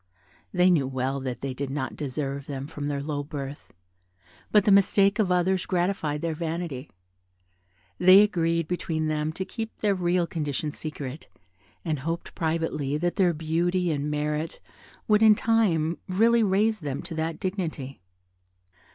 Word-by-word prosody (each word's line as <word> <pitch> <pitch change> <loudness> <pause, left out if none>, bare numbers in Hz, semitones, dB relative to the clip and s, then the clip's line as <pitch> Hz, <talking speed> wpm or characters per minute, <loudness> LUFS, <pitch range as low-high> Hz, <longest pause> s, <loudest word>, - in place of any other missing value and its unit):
They 180 0 +4
knew 145 -7 +2
well 130 +1 -2
that 130 -3 -5
they 135 -1 -3
did 135 +1 -4
not 135 -2 -3
deserve 140 -1 -4
them 135 -1 -4
from 145 -1 -5
their 140 -1 -2
low 145 -1 -2
birth; 140 -1 -7 0.8
but 210 -2 +5
the 210 - +4
mistake 200 +1 +4
of 195 -4 +2
others 180 +1 +1
gratified 175 -5 0
their 165 -1 0
vanity. 160 -4 -4 1.1
They 185 +3 +8
agreed 170 -5 0
between 160 -2 -2
them 155 0 -1
to 190 +3 -4
keep 225 +1 -6
their 205 -2 +1
real 180 -1 +1
condition 150 -2 -3
secret, 150 -2 -7 0.6
and 155 -4 -1
hoped 165 +5 -4
privately 160 -3 -1
that 175 +2 -1
their 185 -3 +4
beauty 170 +3 0
and 145 0 -2
merit 150 +2 -2 0.5
would 210 0 +4
in 220 -1 +7
time 190 -8 +1
really 230 +5 +4
raise 215 +2 +2
them 140 -4 -4
to 170 - -7
that 160 0 -3
dignity. 160 - -4
165 Hz, 150 wpm, -26 LUFS, 145-185 Hz, 1.1 s, They